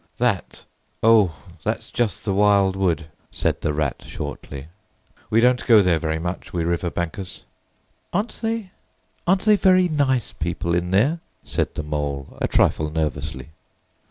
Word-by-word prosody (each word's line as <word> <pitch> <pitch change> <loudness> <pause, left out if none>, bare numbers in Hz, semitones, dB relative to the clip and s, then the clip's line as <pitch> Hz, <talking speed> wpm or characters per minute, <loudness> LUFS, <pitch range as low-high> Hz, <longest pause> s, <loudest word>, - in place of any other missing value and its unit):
"That? 120 -6 -1 0.4
O, 110 -7 +5 0.3
that's - - -3
just 120 -3 -1
the 100 - +1
Wild 100 -1 +4
Wood," 90 -4 0 0.2
said - - -1
the 75 - 0
Rat 75 -2 -1
shortly. 70 -1 -7 0.6
"We 115 - +4
don't 125 0 +3
go 110 -4 +7
there 85 -3 +3
very 80 -1 -1
much, 90 +2 -5
we 85 -2 -1
river 85 +1 0
bankers." 85 +2 -5 0.7
"Aren't 210 +5 -2
they—aren't 195 -3 -3
they 215 -1 +6
very 185 -2 +4
nice 135 -6 +1
people 85 +1 -2
in 90 +1 0
there?" 125 - +2 0.2
said - - -2
the 75 - -3
Mole, 75 -2 -3
a - - +2
trifle 80 -1 +2
nervously. 80 0 -3
95 Hz, 145 wpm, -23 LUFS, 80-125 Hz, 0.7 s, go